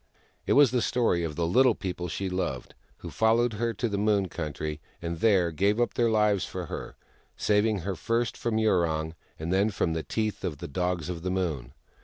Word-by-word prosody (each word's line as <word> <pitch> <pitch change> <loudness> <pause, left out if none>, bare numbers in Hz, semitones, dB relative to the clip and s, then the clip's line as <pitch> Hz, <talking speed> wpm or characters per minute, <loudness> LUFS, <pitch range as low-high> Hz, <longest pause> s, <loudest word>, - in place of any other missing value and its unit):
It - - +3
was 140 -4 +6
the 125 -2 +1
story 110 -8 +1
of 80 -3 -3
the 85 - 0
Little 125 +6 +4
People 90 -2 -4
she 95 +3 -3
loved, 90 -9 -3 0.2
who - - -8
followed 115 +1 +2
her 115 +2 -1
to 120 - -1
the 100 -2 -2
Moon 100 -3 +2
Country, 75 -2 -4 0.2
and 85 -1 -4
there 95 -6 +3
gave 100 +7 +1
up 120 - +1
their 120 -1 +2
lives 105 -3 +2
for - - -5
her, - - -7 0.4
saving 105 -1 +2
her 95 +2 -3
first 115 +7 -1
from 115 -2 -1
Yurong, 85 -7 +1 0.2
and 80 +3 -3
then 100 +3 +3
from 90 -5 -1
the 80 - -1
teeth 110 +8 -3
of 75 -5 -3
the - - -7
Dogs 90 +2 -2
of 90 -2 -4
the 90 - -2
Moon. 80 -10 -2
95 Hz, 205 wpm, -27 LUFS, 85-110 Hz, 0.4 s, was